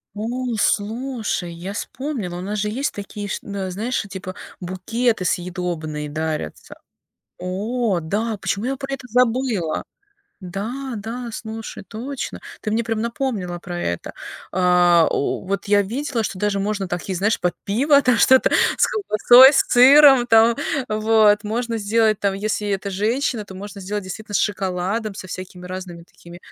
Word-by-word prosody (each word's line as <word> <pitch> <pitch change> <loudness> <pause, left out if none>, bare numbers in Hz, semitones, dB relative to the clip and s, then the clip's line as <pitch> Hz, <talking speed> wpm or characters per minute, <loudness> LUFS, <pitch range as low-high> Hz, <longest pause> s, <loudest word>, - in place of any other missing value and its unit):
О, 240 +3 -3
слушай, 220 -4 -1
я 175 +4 -6
вспомнила, 225 -7 -4
у - - -5
нас 205 +3 -3
же 210 +1 -1
есть 270 +7 -2
такие, 205 0 -6
ш - - -3
а, 200 -2 -4
знаешь, 220 +8 -2
э, - - -10
типа 185 -1 -7 0.3
букеты 195 +5 -1
съедобные 170 -4 -3
дарятся. 155 - -4 0.6
О 205 +2 -1
да! 210 +7 -2
Почему 200 +3 -2
я 270 +2 -1
про 275 0 -6
это 270 -2 -9
забыла? 235 -7 +1 0.6
Да, 225 +9 -5
да. 230 +4 -5
Слушай, 220 0 -7
точно, 245 +7 -6 0.2
ты 215 - -2
мне 225 +2 +1
прям 225 -1 -2
напомнила 230 -7 -3
про 175 0 -6
это. 85 - -3 0.4
А, 175 -2 +4
о - - -1
вот 200 +2 -3
я 205 0 +4
видела, 240 +3 -2
что 195 - -4
даже 205 0 0
можно 200 -1 -2
такие, 175 +2 -3
знаешь, 205 +5 +1
под 180 - 0
пиво 280 +8 +4
там 250 -3 +3
что-то 260 +2 +5 0.3
с - - +5
колбасой, 260 - +6
с - - +3
сыром, 270 0 +7
там, 225 0 +5 0.3
вот. 215 -1 +3
Можно 230 +2 -2
сделать 220 0 +2
там, 200 -1 +1
если 210 +1 -2
это 200 0 -2
женщина, 220 +4 -1
то 190 - -11
можно 200 +1 -8
сделать 205 +1 -4
действительно 205 +3 -7
с - - +4
шоколадом, 195 +2 -1
со 190 - -8
всякими 185 0 -8
разными 180 -2 -7
такими. 175 0 -14
210 Hz, 160 wpm, -21 LUFS, 185-235 Hz, 0.6 s, сыром